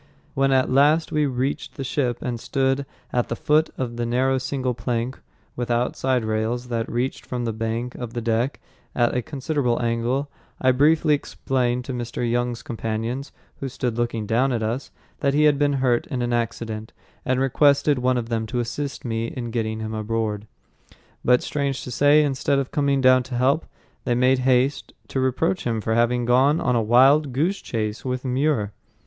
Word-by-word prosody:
When 135 0 +2
at 130 -1 +2
last 150 +5 +4
we 150 -1 +2
reached 130 +1 -2
the 140 - -4
ship 130 -2 -1
and 120 -2 -3
stood 135 +2 0 0.3
at 120 -1 0
the 120 - -1
foot 155 +5 +2
of 120 -2 -3
the 120 - -1
narrow 130 +2 +1
single 130 -1 -2
plank 120 +1 -3 0.4
without 120 0 0
side 130 -3 0
rails 110 +3 -2
that 115 -1 -2
reached 125 +3 -2
from 125 -1 -4
the 115 - -1
bank 115 +2 -3
to 120 - -5
the 120 +1 -5
deck 115 +3 0 0.4
at 120 -1 +2
a 125 - +1
considerable 135 -2 -1
angle, 120 +4 0 0.3
I 130 - +4
briefly 150 +4 +4
explained 125 -3 -1
to 130 - -4
Mr. 120 0 -3
Young's 120 0 -1
companions, 115 0 -3 0.3
who 135 - -3
stood 125 -2 -2
looking 115 -2 -1
down 120 +5 +2
at 115 -3 -1
us, 115 +5 -2 0.3
that 140 0 +1
he 150 - +4
had 150 -2 +4
been 145 -1 +2
hurt 130 -3 +1
in 125 -2 -2
an 120 0 -1
accident, 115 -2 -3 0.3
and 130 0 0
requested 140 +1 +3
one 125 0 +2
of 115 -1 -3
them 110 -2 -1
to 120 - -2
assist 140 +4 -4
me 115 -1 -1
in 120 -1 -5
getting 110 -1 -2
him 110 0 -4
aboard. 110 -1 -2 0.8
But 125 0 +4
strange 140 -2 -2
to 125 - -7
say, 145 +4 +5
instead 140 0 0
of 135 -1 -2
coming 140 -2 +1
down 130 0 +6
to 125 0 -6
help, 135 +6 +2 0.4
they 120 - +1
made 125 +1 +3
haste 130 +2 +1 0.2
to 135 - -2
reproach 160 +8 0
him 115 -2 0
for 110 +1 -1
having 120 +1 +2
gone 130 +6 +4
on 125 -2 +1
a 115 - +3
"wild 135 +6 +5
goose 170 +10 0
chase" 110 -1 -3
with 130 0 -3
Muir. 130 -5 +1
125 Hz, 190 wpm, -23 LUFS, 115-135 Hz, 0.8 s, down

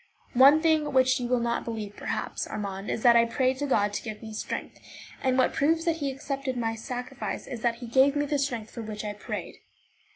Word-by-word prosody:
One 280 +5 +7
thing 310 -3 +2
which 260 0 +4
you 245 - -2
will 250 0 +2
not 235 0 -1
believe, 215 -3 -5
perhaps, - - -3
Armand, 200 -2 -5
is 220 - -2
that 240 -1 +7
I 235 0 +6
prayed 255 +2 0
God 205 -5 +2
to - - -2
give 215 -2 -7
me 220 -1 -7
strength; 215 - -5 0.4
and 260 -1 +1
what 255 - +3
proves 320 +3 +2
that 330 -1 +1
he 285 -3 -1
accepted 270 -1 -4
my 225 -1 0
sacrifice 250 +3 -5
is 245 -4 -7
that 235 0 +1
he 240 +1 -9
gave 265 +4 +4
me 290 0 +1
the 290 0 0
strength 240 -6 -2
for 235 - -7
which 215 -1 -6
I 210 - -3
prayed. 205 - -6
250 Hz, 220 wpm, -27 LUFS, 225-275 Hz, 0.4 s, One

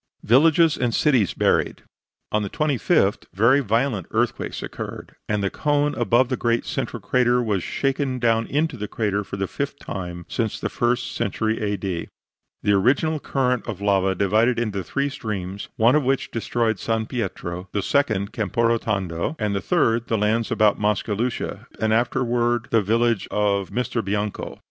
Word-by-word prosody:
VILLAGES 160 +6 +5
AND 120 -2 0
CITIES 130 - +2
BURIED - - +1 0.5
On 105 - +1
the 100 - -3
25th 145 - +1
very 115 +8 +5
violent 115 -4 0
earthquakes - - -1
occurred, - - -7
and 105 -1 0
the 100 - 0
cone 145 -1 +1
above 120 +1 +2
the 130 - 0
great 120 -1 0
central - - -3
crater 125 -1 +2
was 105 -6 0
shaken 135 - -1
down 115 -2 +1
into 150 -1 0
the 105 -1 -4
crater 105 -2 -1
for 100 0 -7
the 95 - -1
fifth 140 +8 -4
time 90 -6 -6
since 115 -3 -2
the - - -2
first 120 0 0
century 110 0 -1
A. 105 -1 -1
D. 90 -3 -3 0.6
The 105 - +3
original 140 +10 +2
current 125 -3 0
of 95 - -4
lava 95 -1 +2
divided 110 +6 +2
into 105 -5 -2
three 140 +10 -1
streams, 100 -6 -5
one 115 +3 +5
of 150 - +3
which 135 +1 0
destroyed 115 -2 -1
San 115 -1 -1
Pietro, 95 -6 -4
the 100 - -1
second 110 -8 +1
Camporotondo, 105 - 0
and 105 -2 -1
the 100 - -1
third 120 -9 +1
the 115 - +1
lands 110 +2 +1
about 105 -2 +3
Mascalucia 105 +3 -1
and 110 +1 +1
afterward 120 0 +1
the 115 - +4
village 115 +1 +1
of 100 -2 0
Misterbianco. 105 -2 -2
115 Hz, 160 wpm, -23 LUFS, 100-125 Hz, 0.6 s, VILLAGES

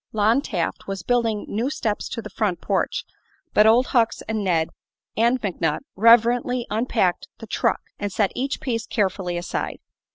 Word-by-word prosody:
Lon 220 +5 +3
Taft 180 -12 -3
was 195 -3 -4
building 230 -4 +1
new 230 +6 -1
steps 215 -7 -2
to 230 - -5
the - - -7
front 200 -6 -1
porch, - - -1 0.5
but 210 +1 +6
Old 235 +4 +5
Hucks 235 -3 +2
and 220 -2 -1
Ned 165 -4 +1 0.5
and 235 +3 +3
McNutt 170 -7 -1
reverently 235 +3 +4
unpacked 215 -5 0
the - - -9
"truck" - - 0 0.2
and 205 -1 -2
set 200 0 +1
each 270 +2 -2
piece 230 -4 -2
carefully 190 -4 -1
aside. 175 0 -3
220 Hz, 160 wpm, -23 LUFS, 195-235 Hz, 0.5 s, but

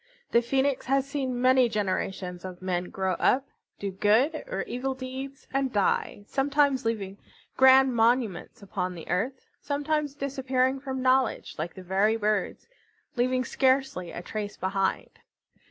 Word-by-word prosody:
The 235 - +5
Phoenix 265 +3 0
had 270 +1 +3
seen 270 -3 -3
many 255 -1 +4
generations 190 -3 -2
of 185 -1 -7
men 180 -1 -2
grow 190 -1 -1
up, 270 +2 +2 0.3
do 200 -1 -4
good 220 - +2
or - - -2
evil 265 +2 -3
deeds, 265 +1 -7
and 270 -1 0
die, 205 0 0
sometimes 275 0 +1
leaving 200 -4 -2 0.4
grand 265 0 +6
monuments 230 -2 +1
upon 185 -2 -3
the 165 - -9
earth, 255 +8 -1 0.2
sometimes 290 0 -1
disappearing 265 -1 0
from 265 -1 -4
knowledge 255 -2 +2
like 165 +2 -4
the 185 - -9
very 195 +4 +2
birds, 210 -3 -1 0.5
leaving 255 +1 +1
scarcely 260 -9 +1
a 175 - -7
trace 210 +1 -5
behind. 190 +1 -2
255 Hz, 140 wpm, -27 LUFS, 200-270 Hz, 0.5 s, grand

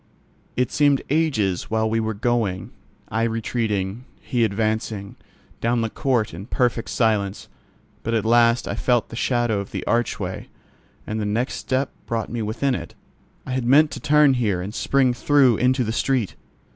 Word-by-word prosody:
It 125 0 +1
seemed 145 -2 +3
ages 115 - +1
while 110 0 +1
we 115 +1 0
were 110 -1 -2
going, 105 -5 -1 0.4
I 110 - -1
retreating, 115 -1 -1
he 120 -2 0
advancing, 110 -1 -1 0.4
down 120 +1 +1
the 115 -1 -2
court 125 - 0
in 95 +6 -8
perfect 120 -2 0
silence; 105 -4 0 0.5
but 115 +1 -1
at 110 - 0
last 115 +1 +4
I - - -2
felt 120 -3 +1
the - - -8
shadow 120 -3 +1
of 100 - -6
the - - -5
archway, 120 +1 -2 0.6
and 110 +1 -3
the - - -1
next 115 +5 -1
step 130 +1 -1 0.2
brought 115 -1 -2
me 120 -1 -2
within 115 +6 -1
it. 85 -6 -6 0.5
I 130 - -6
had 130 -1 -1
meant 150 +4 +5
to - - -6
turn 150 -1 +4
here 110 -8 0
and 95 +4 -5
spring 130 0 +2
through 130 -2 +4
into 130 +1 +2
the 110 - -2
street. 125 -4 0
115 Hz, 170 wpm, -23 LUFS, 110-125 Hz, 0.6 s, meant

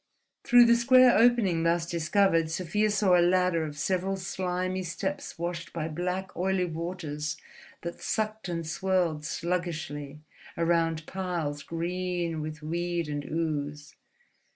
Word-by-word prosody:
Through 245 0 +7
the 235 0 +6
square 255 +1 +6
opening 225 -8 +4
thus 170 0 +2
discovered 165 0 +2
Sofia 185 +6 0
saw 200 -3 +3
a 175 - +5
ladder 180 -1 +3
of 150 -2 -6
several 190 +4 0
slimy 185 0 -2
steps 190 +2 -4
washed 170 0 -4
by 160 -2 -2
black, 180 +3 -3
oily 185 0 +1
waters 160 -3 -4 0.5
that 170 0 -6
sucked 215 -2 -2
and 165 -1 -3
swirled 175 -2 0
sluggishly 155 -4 -3 0.4
round 165 -1 +1
spiles 165 -4 -3
green 175 0 -2
with 155 0 -6
weed 170 0 -2
and 145 -1 -3
ooze. 150 -2 -3
175 Hz, 130 wpm, -28 LUFS, 160-185 Hz, 0.5 s, Through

